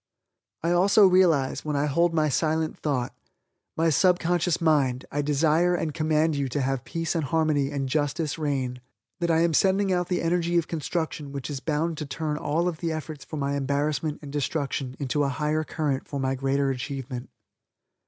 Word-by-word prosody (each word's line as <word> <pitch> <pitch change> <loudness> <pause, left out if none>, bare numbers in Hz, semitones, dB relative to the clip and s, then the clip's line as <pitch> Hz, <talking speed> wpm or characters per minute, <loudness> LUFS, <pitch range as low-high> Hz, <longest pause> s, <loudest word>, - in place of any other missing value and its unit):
I 170 - +1
also 195 +4 +5
realize, 175 -8 +3
when 150 -1 -2
I 140 +1 +1
hold 170 +4 +2
my 155 -2 +2
silent 155 +3 0
thought, 130 -5 -2 0.6
"my 165 0 +3
subconscious 175 0 +2
mind 140 -6 +2
I 145 - 0
desire 155 +4 +2
and 160 -3 -2
command 155 0 +1
you 140 -2 -1
to 140 +3 -1
have 135 -1 -1
peace 165 0 -2
and 165 -3 0
harmony 150 -1 +1
and 140 -2 -2
justice 150 +3 -1
reign," 130 -4 -2 0.4
that 170 -1 0
I 165 0 +3
am 170 -1 +2
sending 195 +3 +3
out 180 -1 0
the 180 -2 -1
energy 175 0 +1
of 170 - +1
construction 160 -2 -3
which 140 0 -5
is 140 - -4
bound 155 +2 -1
to 150 - -4
turn 150 +1 -3
all 160 +4 0
of 165 -3 -3
the 165 -1 -2
efforts 155 -2 -6
for 155 - -7
my 140 0 -1
embarrassment 145 +2 -1
and 140 - -8
destruction 140 -3 -2
into 140 +1 0
a 140 - +1
higher 150 +3 0
current 150 -4 -2
for 140 - -4
my 135 0 0
greater 135 +1 0
achievement. 130 -1 -5
150 Hz, 185 wpm, -26 LUFS, 140-165 Hz, 0.6 s, also